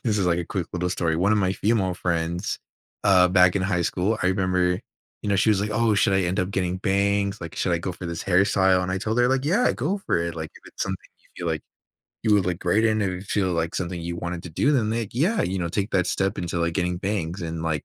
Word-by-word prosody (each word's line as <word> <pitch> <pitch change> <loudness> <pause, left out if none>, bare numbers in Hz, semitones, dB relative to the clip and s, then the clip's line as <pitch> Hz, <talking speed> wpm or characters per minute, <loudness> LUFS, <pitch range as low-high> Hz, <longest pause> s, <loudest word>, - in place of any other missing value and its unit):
this 105 -3 +1
is, 95 - +1
like, 85 -1 +2
a 85 - -2
quick 95 -5 -3
little 90 0 -1
story, 85 -3 0
one 95 +5 +2
of 105 - +3
my 95 -2 +1
female 100 -3 +1
friends, 85 -1 -2 0.5
uh, 95 -3 +6
back 90 +1 +5
in 95 - 0
high 90 -2 0
school, 95 +6 0
I - - +2
remember, 90 -1 +1 0.4
you - - -3
know, 100 - +2
she 100 +4 +3
was 100 -2 +2
like, 105 +1 -2
"Oh, 115 0 +2
should 105 -1 +3
I 95 - +3
end 90 +3 0
up 90 +1 -2
getting 90 -2 -1
bangs? 100 +1 +1
Like, 85 -2 -7
should 90 - 0
I 85 - +2
go 90 +2 -4
for 90 0 -8
this 85 -1 -4
hairstyle?" 95 0 +3
And 90 - -3
I 95 - -1
told 110 +4 -1
her, 120 - +4
like, 135 0 +1
"Yeah, 200 +12 +3
go 165 +12 -1
for 195 - 0
it. 85 0 -2
Like, 80 -1 -5
if - - -16
it's - - -5
something - - -2 0.4
you 85 - -6
feel - - -2
like 80 - -4 0.6
you 110 - +3
would 100 -3 +3
look 90 -2 -1
great 105 +5 +2
in, 110 -1 +2
if 100 - +1
you 90 0 -5
feel 95 -2 0
like 85 0 -1
something 90 -1 -3
you 85 +1 -4
wanted 85 0 -4
to 85 - -7
do, 140 - +2
then, 115 -6 +2
like, 115 -2 -2
yeah, 175 - +1
you 95 +1 -1
know, 85 -2 -1
take 100 +4 -2
that 90 -2 +2
step 95 0 0
into, 85 -1 -2
like, 85 0 0
getting 90 0 0
bangs." 95 -2 -2
And, 80 -1 -4
like, 75 -3 -2
95 Hz, 275 wpm, -24 LUFS, 85-105 Hz, 0.6 s, uh